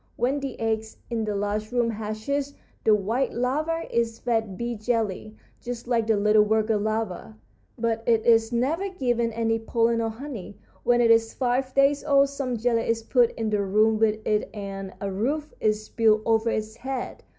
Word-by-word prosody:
When 260 +5 0
the 275 -2 -6
egg 220 -1 0 0.3
in 225 -2 -1
the 210 -1 -2
large 205 +2 -2
room 240 -2 +1
hatches 225 +7 -3 0.3
the 215 - +5
white 225 +6 -1
larva 305 +7 -1
is 230 -1 +1
fed 225 -5 -1
bee 240 0 -2
jelly, 215 -2 -2 0.3
just 240 0 -6
like 230 -3 +1
the 220 -2 +3
little 210 +1 +4
worker 215 +1 +2
larva, 210 - -3 0.4
but 225 -1 -1
it 225 -2 +3
is 225 -1 +4
never 300 +11 0
given 240 -9 0
any 225 0 0
pollen 230 0 +1
or 225 - 0
honey. 225 -4 -8 0.2
When 240 0 +3
it 230 -1 +5
is 225 0 +3
five 255 +1 -1
days 275 +1 +3
old 280 -1 +4
some 275 -3 -3
jelly 230 0 0
is 230 0 0
put 240 0 +3
in 220 -1 -3
the 210 -1 +1
room 215 +3 +2
with 215 -1 +1
it 210 0 0
and 195 -2 -6
a 200 -1 -3
roof 285 +10 -2
is 215 0 0
built 215 -2 +3
over 225 0 +2
its 215 0 -3
head. 260 0 -5
225 Hz, 185 wpm, -25 LUFS, 215-245 Hz, 0.4 s, the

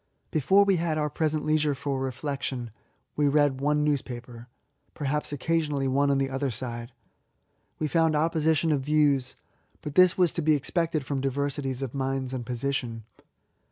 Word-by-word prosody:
Before 190 +7 +4
we 195 -2 +3
had 165 -2 0
our 150 -1 -1
present 155 0 -1
leisure 155 -2 +2
for 140 0 -2
reflection, 130 -2 -3 0.4
we 145 -1 +2
read 140 -2 +2
one 150 +1 +2
newspaper, 125 -5 -3 0.3
— - - -44
^perhaps 150 +1 -2
occasionally 145 -1 0
one 140 +2 +2
on 140 - +3
the 135 0 0
other 135 +1 -1
side. 120 0 -5 0.9
We 155 - -1
found 160 0 +2
opposition 160 0 +2
of 145 -3 +1
views; 140 -2 +2 0.5
but 150 - -5
this 185 +2 +5
was 180 -3 +3
to 170 - -1
be 155 0 +4
expected 155 0 -1
from 140 -1 -2
diversities, 135 -1 -2
of 130 - -5
minds 135 -1 -2
and 125 -2 -3
position. 120 -1 -3
140 Hz, 160 wpm, -27 LUFS, 130-155 Hz, 0.9 s, this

